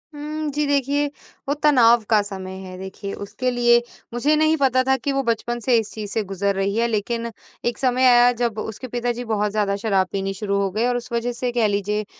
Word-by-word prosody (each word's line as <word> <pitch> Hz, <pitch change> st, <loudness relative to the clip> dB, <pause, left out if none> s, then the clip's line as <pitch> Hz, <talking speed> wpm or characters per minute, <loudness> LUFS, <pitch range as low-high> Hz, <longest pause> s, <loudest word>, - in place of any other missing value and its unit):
हुँ, 305 Hz, +1 st, -4 dB
जी 295 Hz, +1 st, 0 dB
देखिए 285 Hz, +1 st, +1 dB, 0.4 s
वो 285 Hz, -, +1 dB
तनाव 240 Hz, -6 st, +5 dB
का 215 Hz, -2 st, +5 dB
समय 190 Hz, -2 st, -7 dB
है 185 Hz, -1 st, -9 dB
देखिए 190 Hz, +1 st, -7 dB
उसके 205 Hz, +5 st, -3 dB
लिए 240 Hz, -1 st, +4 dB, 0.3 s
मुझे 290 Hz, +6 st, +2 dB
नहीं 310 Hz, +1 st, +3 dB
पता 260 Hz, -2 st, +3 dB
था 265 Hz, 0 st, +2 dB
कि 280 Hz, +3 st, -2 dB
वो 275 Hz, 0 st, +1 dB
बचपन 235 Hz, +1 st, -1 dB
से 240 Hz, +1 st, +2 dB
इस 220 Hz, -2 st, -2 dB
चीज़ 210 Hz, -2 st, -6 dB
से 220 Hz, -1 st, -1 dB
गुज़र 195 Hz, +1 st, -1 dB
रही 195 Hz, +1 st, -1 dB
है, 235 Hz, +1 st, +2 dB
लेकिन 230 Hz, +2 st, -2 dB, 0.3 s
एक 240 Hz, -2 st, -1 dB
समय 255 Hz, 0 st, +2 dB
आया 245 Hz, 0 st, +6 dB
जब 235 Hz, -2 st, -2 dB
उसके 220 Hz, +4 st, -6 dB
पिताजी 245 Hz, 0 st, -2 dB
बहुत 210 Hz, -2 st, 0 dB
ज़्यादा 205 Hz, -2 st, 0 dB
शराब 195 Hz, -4 st, +2 dB
पीनी 195 Hz, 0 st, -2 dB
शुरू 200 Hz, 0 st, -2 dB
हो 195 Hz, -, 0 dB
गए 220 Hz, +4 st, 0 dB
और 245 Hz, 0 st, +1 dB
उस 240 Hz, +1 st, -8 dB
वज़ह 235 Hz, +1 st, 0 dB
से 245 Hz, +1 st, -3 dB
कह 235 Hz, -3 st, +2 dB
लीजिए 210 Hz, +1 st, -1 dB
235 Hz, 220 wpm, -22 LUFS, 205-255 Hz, 0.4 s, आया